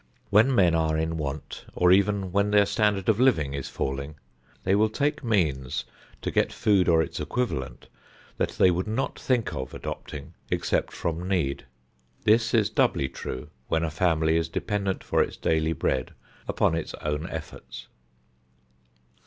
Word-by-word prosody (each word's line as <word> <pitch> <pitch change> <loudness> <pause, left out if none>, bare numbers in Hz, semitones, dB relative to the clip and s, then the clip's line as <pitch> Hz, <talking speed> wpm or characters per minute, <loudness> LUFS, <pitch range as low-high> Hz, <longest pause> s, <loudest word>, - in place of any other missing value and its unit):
When 115 +6 +5
men 90 -6 +4
are 80 -1 +1
in 80 +1 -1
want, 75 -2 -5
or 90 0 +4
even 100 0 +3
when 100 +2 +2
their 105 -1 +5
standard 105 -2 +1
of 110 0 +3
living 80 - +3
is 70 -1 -4
falling, 70 +2 -3 0.5
they 95 - +2
will 110 +2 +4
take 145 +6 -1
means 75 - 0 0.4
to - - -1
get - - +2
food 100 -4 +2
or 80 -1 +5
its - - -6
equivalent 115 - -3 0.5
that - - 0
they 90 - +4
would 90 +4 -1
not 110 +5 -2
think 125 -4 0
of - - -5
adopting 75 -3 -7 0.2
except - - 0
from 85 +2 -3
need. 85 -11 -1 0.6
This 115 +2 +3
is 110 -3 +3
doubly 65 - +2
true 75 +4 -7 0.2
when 80 0 +1
a 80 - -1
family 80 -1 +2
is 80 0 -1
dependent 100 +2 -2
for - - +2
its - - -2
daily 80 0 +1
bread 65 -3 -1 0.3
upon - - +2
its 80 -1 -3
own 75 +3 -3
efforts. 80 -6 -8
85 Hz, 160 wpm, -26 LUFS, 80-105 Hz, 0.6 s, When